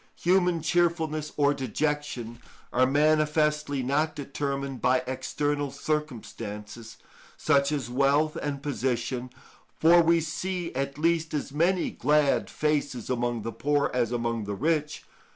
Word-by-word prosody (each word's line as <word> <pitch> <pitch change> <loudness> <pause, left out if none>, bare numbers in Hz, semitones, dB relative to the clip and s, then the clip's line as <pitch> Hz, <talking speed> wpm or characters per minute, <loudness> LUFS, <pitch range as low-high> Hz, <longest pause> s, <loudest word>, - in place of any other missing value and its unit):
Human 175 -2 +2
cheerfulness 160 -2 0
or 145 -1 +4
dejection 135 -3 -3 0.3
are 130 +1 +4
manifestly 150 -1 +2
not 150 +4 0
determined 140 -1 -4
by 125 0 +3
external 145 +2 -2
circumstances, 115 -7 -5 0.4
such 140 +1 +2
as 140 -5 -2
wealth 140 +5 +2
and 140 -2 -4
position, 125 -1 -2 0.5
for 170 +2 +7
we 170 0 +4
see 175 +2 -3
at 140 +1 -3
least 165 0 +1
as 145 -1 -3
many 170 +5 +1
glad 150 +1 +2
faces 145 -5 -1
among 120 -2 -1
the 115 - -3
poor 140 +6 0
as 120 -2 0
among 115 -2 -1
the 100 0 -3
rich. 150 +4 -1
145 Hz, 125 wpm, -27 LUFS, 125-155 Hz, 0.5 s, for